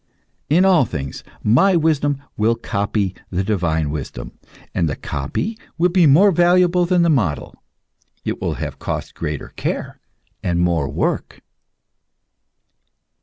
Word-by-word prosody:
In 175 +6 +4
all 185 -6 +5
things 75 - -5 0.2
my 180 - +4
wisdom 145 -3 +1
will 110 +2 +2
copy 100 -3 -1 0.2
the 95 +1 -1
divine 85 -7 0
wisdom, 75 -3 -6 0.4
and 85 -4 +1
the 70 - -2
copy 75 - -4 0.2
will 175 +2 +3
be 175 -3 +5
more 180 +9 +6
valuable 175 0 +3
than 180 -1 +3
the 170 - +3
model; 105 - -1 0.6
it - - -3
will - - -1
have - - -5
cost - - -4
greater 75 -3 -5
care - - -4 0.4
and 85 -1 0
more 85 -5 +1
work. - - -2
115 Hz, 130 wpm, -20 LUFS, -, 0.6 s, more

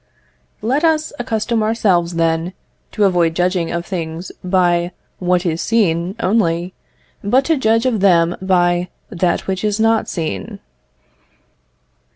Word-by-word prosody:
Let 265 +8 0
us 315 -2 +1
accustom 225 -1 -1
ourselves, 190 -6 +1
then, 165 +1 0 0.4
to 215 - +1
avoid 175 -4 +2
judging 180 -1 0
of 170 0 -3
things 170 -1 -5
by 175 -1 +1 0.3
what 180 0 +1
is 165 -1 -1
seen 185 -5 +1
only, 180 -4 0 0.5
but 255 +7 +2
to 325 - +2
judge 225 -3 +2
of 240 -5 +1
them 175 -3 +3
by 175 -1 +1 0.2
that 180 -2 0
which 190 0 -3
is 210 0 0
not 225 0 +2
seen. 155 - -4
185 Hz, 130 wpm, -18 LUFS, 170-220 Hz, 0.5 s, them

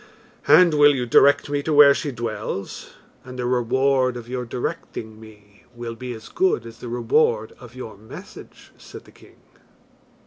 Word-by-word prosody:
"And 180 -3 +6
will 145 -1 +5
you 125 -2 -2
direct 140 +4 +4
me 145 0 -2
to 155 - -3
where 145 -1 +8
she 145 - -4
dwells? 110 -5 -6 0.3
and 130 0 -10
the 125 - -3
reward 130 +1 +1
of 120 -1 -10
your 125 0 -4
directing 110 -2 -6
me 105 -2 -18
will 120 -1 -6
be 125 +2 -8
as 110 -1 -11
good 185 -11 0
as 115 0 -12
the 120 - -8
reward 115 -2 0
of 120 -1 -14
your 120 -4 -9
message," 110 +2 -13
said - - -13
the - - -18
king. - - -20
125 Hz, 170 wpm, -22 LUFS, 115-135 Hz, 0.3 s, where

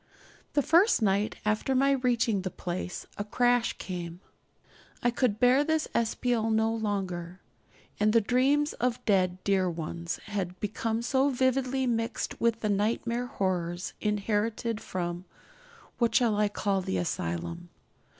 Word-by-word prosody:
The 290 - +2
first 340 - +4
night 200 +1 +1
after 215 +5 +1
my 275 +2 +4
reaching 245 -6 +1
the 185 - -3
place 180 0 -5
a - - 0
crash 245 +3 +2
came. 175 -2 -6 0.8
I 240 - +3
could 235 -3 0
bear 250 +4 +5
this 315 0 0
espial 230 0 0
no 220 0 +2
longer; 190 -5 -3 0.6
and 215 0 +3
the 230 - +5
dreams 270 +7 +2
of 250 -1 -2
dead 185 -3 +2
dear 190 -2 +2
ones 170 0 -4
had 185 -3 -4
become 225 +2 -2
so 265 +3 +2
vividly 260 0 +1
mixed 230 -2 -2
with 230 -1 +2
the 215 - 0
nightmare 230 +4 0
horrors 180 -4 -2
inherited 210 +2 -1
from 175 0 -4 0.7
(what 235 -2 +2
shall 235 -4 +4
I 210 0 +3
call 200 -1 0
the 95 - -2
asylum?) 90 - -3
215 Hz, 140 wpm, -28 LUFS, 185-245 Hz, 0.8 s, bear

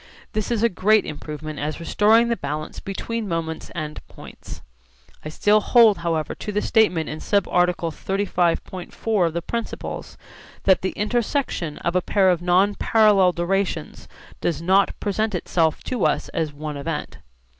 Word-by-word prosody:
This 215 -1 -2
is 230 -2 0
a - - +6
great 215 +1 +3
improvement 155 0 -7
as 150 +2 -3
restoring 220 +7 +3
the 235 - +1
balance 150 -3 -5
between 220 +3 -4
moments 165 -2 -3
and 150 -2 -5
points. - - -12 0.6
I 155 - -5
still 210 +7 +3
hold 225 -1 +5
however 165 -2 -1
to 210 - -6
the 210 0 -1
statement 180 -8 +2
in 155 - -5
subarticle 180 -4 +1
35.4 185 +1 -1
of 165 - -4
the 170 0 -3
Principles 235 +3 -5 0.5
that 190 -1 +4
the 190 - -2
intersection 215 - -1
of 170 - 0
a 180 - +3
pair 190 0 +3
of 175 -1 -1
non 185 +3 +3
parallel 210 -4 +4
durations 175 - -2 0.3
does 170 - -1
not 190 +4 +2
present 210 +1 -1
itself 165 -2 0
to 255 - -2
us 150 - -1
as 160 -2 -2
one 150 0 -6
event. 140 - -5
185 Hz, 155 wpm, -23 LUFS, 160-210 Hz, 0.6 s, a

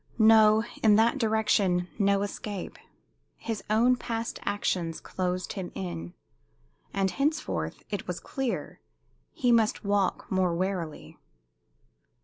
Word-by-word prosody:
No 220 -1 +6 0.2
in 215 -2 +6
that 230 +5 +3
direction, 210 -6 +2
no 200 0 +3
escape; 205 -1 -6 0.6
his 225 -2 -4
own 235 +4 +4
past 230 -1 -4
actions 175 -5 -1
closed 185 -1 -3
him 185 -2 -5
in. 85 -2 -5 0.8
And 195 -1 0
henceforth, 300 - -2
it - - -4
was - - -3
clear, 270 -4 -4 0.5
he 245 -2 +1
must 225 -2 +2
walk 200 -1 +1
more 185 -2 +2
warily. 180 -3 -4
205 Hz, 115 wpm, -28 LUFS, 185-225 Hz, 0.8 s, No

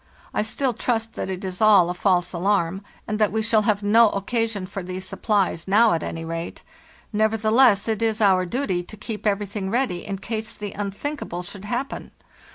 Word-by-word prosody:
I - - +1
still 245 +4 -1
trust 225 -1 -1
that - - -4
it 185 0 -4
is 185 0 -4
all 205 -5 +6
a 175 - -2
false 180 -1 +1
alarm, 190 0 0 0.3
and 215 0 -2
that 215 -2 +3
we 220 +1 0
shall 220 0 +3
have 205 -1 +1
no 220 +2 +6
occasion 215 0 -2
for 195 +1 -6
these 185 +1 -6
supplies 195 -4 0
now, 215 +3 +5
at 165 - 0
any 165 +1 -5
rate; 165 +1 -5 0.5
nevertheless, 220 +1 +3
it 220 -1 -1
is 225 -1 +1
our 190 -4 +3
duty 190 -5 -1
to 195 +5 -12
keep 215 0 -4
everything 200 -1 -1
ready 235 -6 -1
in 195 -1 -3
case 220 +2 -4
the 205 -1 -6
unthinkable 200 - -4
should 195 +2 -7
happen. 245 +6 -4
205 Hz, 185 wpm, -23 LUFS, 185-220 Hz, 0.5 s, all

